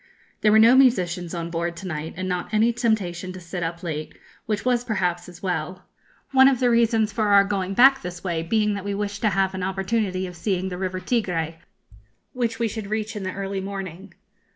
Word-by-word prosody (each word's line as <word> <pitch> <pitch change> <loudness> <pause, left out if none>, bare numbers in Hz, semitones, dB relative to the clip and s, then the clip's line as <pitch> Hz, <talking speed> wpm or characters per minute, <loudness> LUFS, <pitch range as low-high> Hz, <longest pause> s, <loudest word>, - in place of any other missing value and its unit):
There 210 - +4
were 215 - +6
no 230 +3 +7
musicians 180 -10 +2
on 170 0 -4
board 170 0 -2
to 185 - -7
night, 155 -1 -5
and 185 0 -3
not 180 +1 -3
any 220 +2 +3
temptation 195 -7 -1
to 185 - -8
sit 175 +1 -6
up 170 +1 -4
late, 155 -3 -5 0.3
which 210 0 -2
was 245 -1 +2
perhaps 180 -6 -1
as 175 +1 -14
well; 180 0 -3 0.5
one 265 -1 +7
of 265 -3 +3
the 250 -2 +3
reasons 225 -2 +2
for 215 -1 0
our 200 -1 +6
going 195 -1 -2
back 265 +3 +6
this 180 -1 -7
way 170 -4 -1
being 210 +5 +1
that 200 -1 -4
we 200 0 -3
wished 205 0 -3
to 215 - +3
have 195 -1 +1
an 190 - -4
opportunity 190 0 -1
of 180 -1 -8
seeing 185 +1 -1
the 180 - -5
River 185 -1 -2
Tigré, 180 -6 -1 0.8
which 235 -2 -1
we 230 - 0
should 220 -1 -5
reach 215 +1 -3
in 210 - -4
the 185 -1 -4
early 195 0 -3
morning. 190 -2 -7
195 Hz, 215 wpm, -24 LUFS, 180-220 Hz, 0.8 s, no